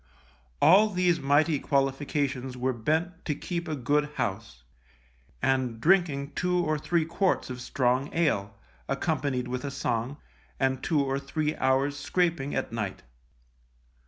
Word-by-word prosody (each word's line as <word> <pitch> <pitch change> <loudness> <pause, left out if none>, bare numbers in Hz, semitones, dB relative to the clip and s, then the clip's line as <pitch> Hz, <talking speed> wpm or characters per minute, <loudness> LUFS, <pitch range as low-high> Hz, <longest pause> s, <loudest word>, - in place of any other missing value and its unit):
All 200 +6 +7
these 180 -3 +2
mighty 145 +2 +3
qualifications 135 -2 -1
were 130 +1 0
bent 160 - -1
to 150 - -1
keep 175 +3 -4
a 155 - -2
good 145 +3 +1
house, 95 - -4 0.8
and 130 -4 +1
drinking 150 -4 +2
two 180 +3 0
or 155 -3 +1
three 170 +1 +1
quarts 170 -3 0
of 125 0 -6
strong 130 +2 0
ale, 110 -12 0 0.3
accompanied 140 -3 -1
with 125 +1 -4
a 140 - -2
song, 125 -1 -2 0.4
and 130 -1 +1
two 150 -4 +1
or 135 0 -1
three 150 +2 -2
hours' 135 +2 +1
scraping 160 -2 0
at 135 -3 -2
night. 110 -4 -4
140 Hz, 135 wpm, -28 LUFS, 130-160 Hz, 0.8 s, All